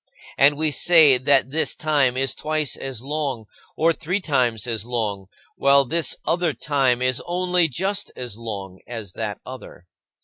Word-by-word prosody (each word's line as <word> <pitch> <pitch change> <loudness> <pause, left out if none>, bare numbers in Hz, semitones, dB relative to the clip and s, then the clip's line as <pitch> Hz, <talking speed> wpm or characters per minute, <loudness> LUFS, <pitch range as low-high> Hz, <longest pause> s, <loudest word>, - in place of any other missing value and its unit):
And 145 +1 +4
we 155 0 +1
say 155 -5 +6
that 135 0 +3
this 160 +2 0
time 145 -5 +1
is 135 -1 0
twice 155 -2 -2
as 130 -3 -7
long, 140 -5 -3 0.3
or 165 +1 +3
three 175 +5 -2
times 125 - 0
as 115 -4 -2
long, 110 -5 -3 0.3
while 140 0 +4
this 165 +4 0
other 170 -3 0
time 130 -3 0
is 130 -1 +1
only 180 -1 +1
just 190 +8 -3
as 125 -4 -5
long 100 -5 -7
as 110 -6 -7
that 105 -2 -4
other. 125 -8 -11
135 Hz, 160 wpm, -22 LUFS, 120-155 Hz, 0.3 s, say